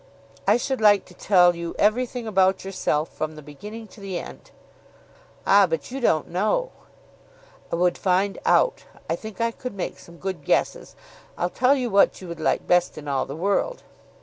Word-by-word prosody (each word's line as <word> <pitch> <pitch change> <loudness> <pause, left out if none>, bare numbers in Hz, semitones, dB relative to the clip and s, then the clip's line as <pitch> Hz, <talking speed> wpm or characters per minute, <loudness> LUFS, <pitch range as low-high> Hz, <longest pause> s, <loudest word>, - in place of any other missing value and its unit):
"I - - +5
should 260 0 -2
like 205 -2 +5
to 180 - -16
tell 180 -2 +4
you 170 0 -5
everything 240 +3 +1
about 190 -3 +2
yourself, 165 -5 -1
from 155 0 -4
the 155 - -11
beginning 210 +10 -9
to 215 - -15
the 195 -2 -4
end." - - -9 1.0
"Ah, 200 -1 +6
but 165 +5 -3
you 270 - -4
don't 160 - +2
know." 215 - 0 1.0
"I - - +1
would 175 +1 +1
find 190 +1 +1
out. - - +2 0.2
I - - 0
think 220 -3 -10
I 230 0 +1
could 250 -1 -7
make 190 - -4
some 170 0 -15
good 185 -5 -5
guesses. - - 0 0.4
I'll 175 +1 -1
tell 255 +2 +3
you 250 -4 -2
what 200 0 +4
you 185 - -9
would 170 -1 -7
like 155 - 0
best 180 -2 +2
in 150 -1 -8
all 135 -2 -1
the 140 - -6
world." 200 - -1
190 Hz, 185 wpm, -24 LUFS, 170-220 Hz, 1.0 s, Ah